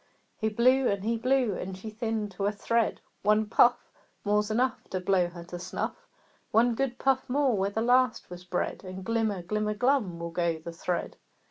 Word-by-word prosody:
He 220 - -1
blew 255 +4 +4
and 200 -1 0
he 230 +2 +1
blew, 250 -1 +2
and 185 +1 -5
she 215 +3 -7
thinned 220 -2 -2
to 195 +2 -2
a - - +2
thread. 230 +2 0 0.2
"One 210 +1 +3
puff 240 +3 +3 0.3
More's 210 +1 +2
enough 245 +4 0
To 185 - -2
blow 185 -1 +2
her 175 0 -9
to 175 0 -8
snuff! 185 - -5 0.4
One 235 +2 +4
good 250 0 -1
puff 270 -1 +1
more 270 -2 +2
where 195 0 +1
the 220 +2 -2
last 250 0 +3
was 180 0 -8
bred, 180 0 -3
And 185 0 -7
glimmer, 220 -4 0
glimmer, 210 +3 -1
glum 245 -7 +1
will 170 0 -5
go 170 -1 0
the 160 +2 -8
thread!" 175 +1 -3
210 Hz, 195 wpm, -28 LUFS, 185-240 Hz, 0.4 s, blew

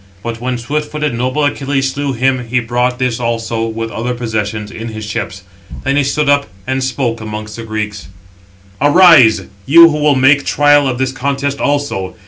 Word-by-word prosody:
But 115 -1 -5
when 125 0 -2
swift 150 +6 -3
footed, 150 -3 -2
noble 130 +5 -1
Achilles 135 -2 -1
slew 140 0 -2
him, 130 0 0
he 125 +2 +1
brought 125 +1 -1
this 125 -2 -1
also, 115 -1 -2
with 115 0 -5
other 125 +2 -3
possessions, 105 -3 -3
in 115 +1 -7
his 110 -1 -7
ships. 100 -2 -5 0.4
Then 135 +1 0
he 145 - +2
stood 145 +2 -1
up, 145 0 +2 0.2
and 130 0 -2
spoke 125 -3 -2
amongst 105 0 -6
the 115 - -7
Greeks: 105 -2 -5 0.7
"Arise, 145 - +6 0.2
you 165 +3 +8
who 150 - -2
will 150 -1 +3
make 135 +2 +4
trial 145 -1 +3
of 125 -2 -2
this 130 0 -1
contest 140 +1 -2
also. 140 -10 -2
125 Hz, 180 wpm, -15 LUFS, 115-140 Hz, 0.7 s, you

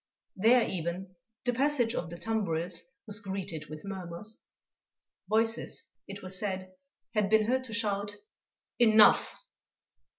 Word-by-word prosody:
There 230 +5 +5
even, 185 +2 -4 0.3
the 245 - +2
passage 255 -2 +2
of 170 - -3
the 170 - -7
tumbrils 180 -6 -1 0.2
was 210 -1 -1
greeted 190 -6 -5
with 155 +2 -8
murmurs. 190 +2 -4 0.9
Voices, 225 +1 0 0.2
it 200 0 -8
was 185 0 -1
said, 185 -2 -3 0.4
had 210 -3 +2
been 220 0 +5
heard 260 +3 +1
to 230 - -8
shout: 205 -2 -1 0.6
"Enough!" 220 -3 +6
205 Hz, 125 wpm, -30 LUFS, 185-225 Hz, 0.9 s, Enough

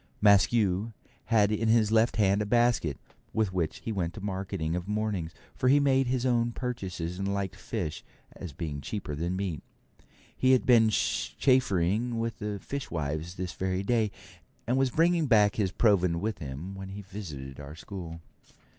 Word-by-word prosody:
Maskew 100 0 +3 0.3
had 110 -3 +3
in 110 +1 0
his 110 -1 +4
left 115 +1 +3
hand 100 -1 +3
a - - -1
basket, 120 - +2 0.4
with 110 -4 0
which 85 -4 -2
he 115 - -2
went 95 0 -3
marketing 95 -4 -3
of 90 +1 -4
mornings, 105 -6 -2 0.2
for 130 - +1
he 145 +2 +6
made 135 -2 +3
his 125 0 0
own 120 -2 +2
purchases, 95 -9 -4
and 100 0 -1
liked 100 -2 -2
fish, 90 -10 -4 0.3
as 90 - -7
being 70 -1 -5
cheaper 90 0 -5
than 85 +5 -2
meat. 95 -5 -3 0.7
He 130 0 +4
had 130 - +3
been 115 -3 +6
chaffering 115 -1 +1
with 115 -1 -3
the 105 -1 -3
fishwives 85 - -4
this 90 -1 -4
very 95 0 -2
day, 110 0 +2 0.6
and 125 - +1
was 135 0 +2
bringing 165 +3 +2
back 105 -5 +4
his 100 -4 +1
provend 90 -6 +3
with 105 -2 -3
him 75 +5 -6
when 95 0 -7
he 100 +1 -7
visited 75 -10 -8
our 70 +1 -9
school. 85 -1 -8
100 Hz, 165 wpm, -28 LUFS, 90-115 Hz, 0.7 s, he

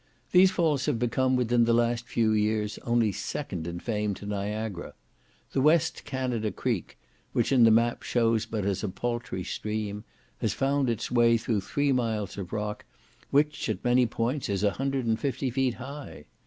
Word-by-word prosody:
These 185 +1 +7
falls 160 -7 +1
have 145 -6 +1
become 130 +2 +1
within 120 -1 +3
the 115 0 +3
last 120 0 +1
few 110 -2 +1
years 105 0 0
only 120 -3 +1
second 85 -2 -4
in 85 0 -4
fame 105 -1 -2
to 100 - -10
Niagara. 105 -1 -4 0.6
The 135 - +1
West 160 +3 +2
Canada 125 -5 -2
Creek, 115 -9 -3 0.4
which - - +1
in 125 -4 +6
the - - +7
map 115 +2 +3
shows 115 -2 +1
but 110 -3 -3
as 100 0 -1
a 105 - -1
paltry 120 -3 -3
stream, 105 +1 -4 0.4
has - - -1
found 135 -1 +1
its 115 -1 -2
way 120 -1 +5
through 110 -2 -1
three 145 +8 0
miles 110 -6 -1
of 95 -3 -6
rock, 105 -1 -3 0.5
which, 150 +1 +1
at - - -3
many 125 0 +4
points, 120 +4 -2
is 100 0 -1
150 130 +3 0
feet 130 -1 0
high. 135 - -9
115 Hz, 170 wpm, -28 LUFS, 105-130 Hz, 0.6 s, These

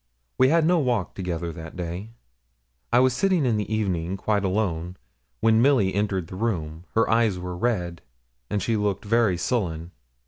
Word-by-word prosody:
We 130 +1 +6
had 165 +1 +4
no 175 +1 +4
walk 120 - 0
together 85 -3 -3
that 80 0 -9
day. 90 +4 -5 0.8
I 120 - +4
was 130 0 +4
sitting 180 +2 +2
in 115 -4 +2
the 105 0 -3
evening, 95 -4 -1
quite 100 +1 0
alone, 90 -3 -1 0.4
when 110 0 +4
Milly 120 -8 +3
entered 100 -3 0
the 90 - -9
room. 85 -6 -3
Her 115 - +3
eyes 115 -4 +2
were 90 0 -5
red, 90 -5 -1 0.5
and 100 -3 -1
she 115 +2 +1
looked 105 -1 -1
very 110 -4 +2
sullen. 85 -5 -2
100 Hz, 170 wpm, -25 LUFS, 90-115 Hz, 0.8 s, We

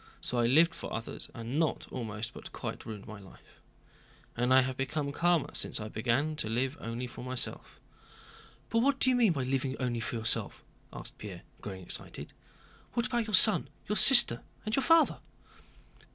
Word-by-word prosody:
—So 125 - -1
I 120 - +3
lived 160 +6 +4
for - - -8
others, 115 0 -4
and 120 +6 -3
not 160 -2 0
almost, 115 -1 -5
but - - -10
quite, - - -6
ruined 105 -3 -7
my 110 -1 -9
life. 95 -1 -18 0.7
And 125 +2 0
I 130 0 +7
have 130 0 -2
become 140 +2 -2
calmer 170 +1 +1
since - - -3
I 105 0 -6
began 125 +8 0
to 110 - -3
live 130 +5 -1
only 115 +2 -5
for 120 - -9
myself." 130 -1 -3 0.9
"But 230 - +3
what 275 +3 +2
do 260 - +4
you - - +2
mean 235 -6 +4
by 140 -5 -2
living 135 +1 -2
only 125 -3 -1
for 115 - -4
yourself?" 110 -1 -1 0.3
asked - - -10
Pierre, - - -8 0.2
growing 95 -2 -7
excited. - - -6 0.6
"What 235 0 0
about 235 -3 -1
your 215 - +3
son, 200 -6 +5 0.2
your 210 - -1
sister, 240 +1 +8 0.2
and 215 +1 0
your 270 - +1
father?" 330 +2 +4
130 Hz, 180 wpm, -30 LUFS, 115-175 Hz, 0.9 s, sister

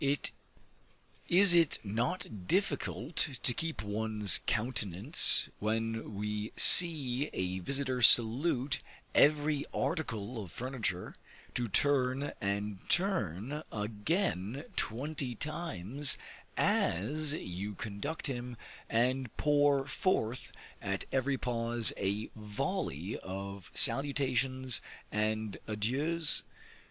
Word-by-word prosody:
Is 185 +1 +6
it 165 -3 +4
not 110 - -3
difficult 160 - -1 0.3
to 120 - +3
keep 160 -4 -3
one's 105 0 0
countenance, 110 - +2
when 115 0 -2
we 105 +1 -3
see 145 -5 +5
a 95 0 -2
visiter 130 +4 -1
salute 125 +4 +5 0.3
every 150 0 +4
article 115 - -2
of 90 - -11
furniture, 120 -8 -3 0.4
to 120 -1 -1
turn 135 +3 +1
and 100 0 -2
turn 150 - 0
again 110 - -1
twenty 130 +2 -2
times 145 - -1 0.4
as 145 - +1
you 100 - -5
conduct 110 - -5
him, 125 -3 -4 0.3
and 125 +1 0
pour 145 -2 +3
forth 130 - -1 0.3
at 100 -1 -2
every 135 +1 +1
pause 120 -2 +1
a 100 +3 -2
volley 110 - -3
of 95 -1 -7
salutations 130 -2 +2 0.3
and 110 0 -1
adieus? 140 +10 0
120 Hz, 90 wpm, -32 LUFS, 105-145 Hz, 0.4 s, Is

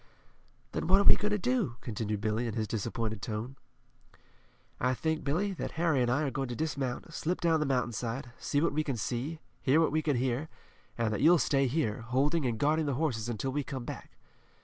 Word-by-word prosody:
"Then - - -2
what 190 +2 +6
are - - +4
we - - +8
going 210 - -1
to 210 - +1
do?" 235 - 0
continued 105 -3 -3
Billy 110 +2 0
in 110 - -3
his 110 -1 -1
disappointed 110 -1 -2
tone. 110 +5 -4 1.2
"I 125 +1 +2
think, 160 +3 -1
Billy, 185 +8 0
that 180 - -5
Harry 160 -5 +2
and 120 - +2
I 135 +5 +2
are 140 - 0
going 135 +1 -2
to 120 - -4
dismount, 145 0 -3
slip 175 +4 -1
down 165 -2 +3
the 150 - 0
mountainside, 125 -1 -1
see 145 - 0
what 165 - +2
we 155 +1 +1
can 135 -5 -2
see, 125 +8 -2 0.2
hear 135 +4 +4
what 165 - +3
we 155 +1 +2
can 150 -3 +1
hear, 130 +5 -1 0.5
and 115 -2 +1
that 105 - -2
you'll 170 +4 +7
stay 140 -3 +2
here, 125 -5 0
holding 135 +6 +1
and 115 -2 -1
guarding 150 +4 +2
the 140 - 0
horses 120 -6 -1
until 120 +3 -2
we 145 +2 -1
come 130 -2 -5
back." - - -8
135 Hz, 215 wpm, -31 LUFS, 120-155 Hz, 1.2 s, we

